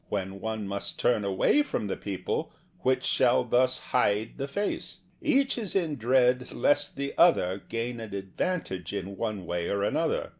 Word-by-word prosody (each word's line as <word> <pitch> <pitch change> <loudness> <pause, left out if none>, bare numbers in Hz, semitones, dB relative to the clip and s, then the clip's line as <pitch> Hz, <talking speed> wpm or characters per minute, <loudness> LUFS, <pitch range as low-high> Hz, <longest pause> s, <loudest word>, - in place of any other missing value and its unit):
When 95 -1 -3
one 110 -2 -3
must 100 0 -4
turn 115 -4 +2
away 100 - +3
from 290 - -2
the 100 - -2
people, 100 -2 -3 0.3
which 130 0 +1
shall 125 0 +3
thus 125 +1 +3
hide 115 -7 0
the 135 - -2
face? 200 +9 -3 0.2
Each 275 -4 +2
is 210 -5 -4
in 165 -6 +1
dread 125 +1 +2
lest 145 0 +1
the 140 0 -3
other 100 - +4
gain 115 +1 -3
an 110 -3 -6
advantage 95 - -3
in 100 0 -4
one 105 -3 -3
way 85 0 -2
or 100 0 0
an - - 0
other. - - 0
115 Hz, 175 wpm, -28 LUFS, 100-140 Hz, 0.3 s, other